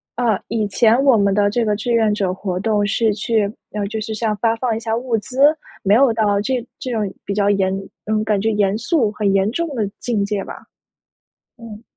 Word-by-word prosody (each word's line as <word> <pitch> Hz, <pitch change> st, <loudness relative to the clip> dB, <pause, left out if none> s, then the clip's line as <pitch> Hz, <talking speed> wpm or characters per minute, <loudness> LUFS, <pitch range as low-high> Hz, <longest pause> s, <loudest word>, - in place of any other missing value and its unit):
啊， 230 Hz, -5 st, +1 dB
以 215 Hz, -3 st, 0 dB
前 230 Hz, +4 st, +3 dB
我 265 Hz, -5 st, +5 dB
们 200 Hz, -1 st, +2 dB
的 205 Hz, 0 st, +3 dB
这 230 Hz, +2 st, 0 dB
个 210 Hz, -, +1 dB
志 220 Hz, +4 st, -3 dB
愿 220 Hz, -2 st, +3 dB
者 190 Hz, -3 st, -1 dB
活 185 Hz, -1 st, -3 dB
动 205 Hz, 0 st, +1 dB
是 215 Hz, +1 st, +1 dB
去 215 Hz, 0 st, 0 dB, 0.3 s
呃， 210 Hz, -1 st, -2 dB
就 220 Hz, +1 st, -4 dB
是 220 Hz, +1 st, -4 dB
像 215 Hz, -1 st, -1 dB
发 230 Hz, +1 st, +1 dB
放 235 Hz, -2 st, -1 dB
一 225 Hz, -, -3 dB
下 225 Hz, 0 st, -2 dB
物 240 Hz, -1 st, -1 dB
资， 255 Hz, +5 st, -7 dB, 0.4 s
没 200 Hz, +2 st, +4 dB
有 255 Hz, -2 st, +4 dB
到 205 Hz, -2 st, +1 dB
这 245 Hz, +2 st, -2 dB
这 255 Hz, -, -5 dB
种 210 Hz, -4 st, -1 dB
比 200 Hz, -, -2 dB
较 200 Hz, 0 st, +1 dB
严 190 Hz, -2 st, +1 dB, 0.3 s
嗯， 215 Hz, 0 st, 0 dB
感 210 Hz, -2 st, +1 dB
觉 220 Hz, +2 st, 0 dB
严 205 Hz, 0 st, +1 dB
肃 235 Hz, -3 st, +1 dB
很 210 Hz, -2 st, 0 dB
严 195 Hz, +2 st, +2 dB
重 335 Hz, +5 st, -2 dB
的 210 Hz, -4 st, -1 dB
境 220 Hz, -5 st, -1 dB
界 200 Hz, -1 st, -2 dB
吧。 -, -, -10 dB, 1.0 s
嗯。 225 Hz, -1 st, -10 dB
215 Hz, 235 characters per minute, -19 LUFS, 205-230 Hz, 1.0 s, 我